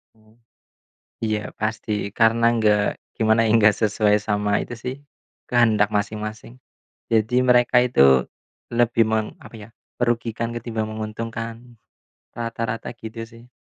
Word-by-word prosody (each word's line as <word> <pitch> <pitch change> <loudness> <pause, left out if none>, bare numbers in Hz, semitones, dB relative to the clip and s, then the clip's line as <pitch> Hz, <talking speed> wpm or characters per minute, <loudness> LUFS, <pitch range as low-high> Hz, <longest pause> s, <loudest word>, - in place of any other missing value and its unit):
Mmm. 110 0 -26 0.9
Iya 105 -1 -2
pasti, 110 0 -3 0.2
karena 115 +1 +3
enggak, 105 -2 +3 0.4
gimana 110 0 +3
ya 110 - +1
enggak 105 -2 +5
sesuai 105 0 +3
sama 105 -1 -1
itu 120 - -7
sih, 125 +1 -3 0.6
kehendak 110 -4 +3
masing-masing. 110 +3 -4 0.6
Jadi 110 +2 +2
mereka 120 0 +4
itu 125 - +2 0.7
lebih 115 -1 +3
meng 110 -1 +1 0.2
apa - - -12
ya, 110 - -13 0.3
merugikan 115 -1 -1
ketimbang 115 -2 -3
menguntungkan. 115 +1 -5 0.8
Rata-rata 115 -1 -4
gitu 115 0 -8
sih. 115 +1 -16
110 Hz, 120 wpm, -22 LUFS, 110-115 Hz, 0.9 s, enggak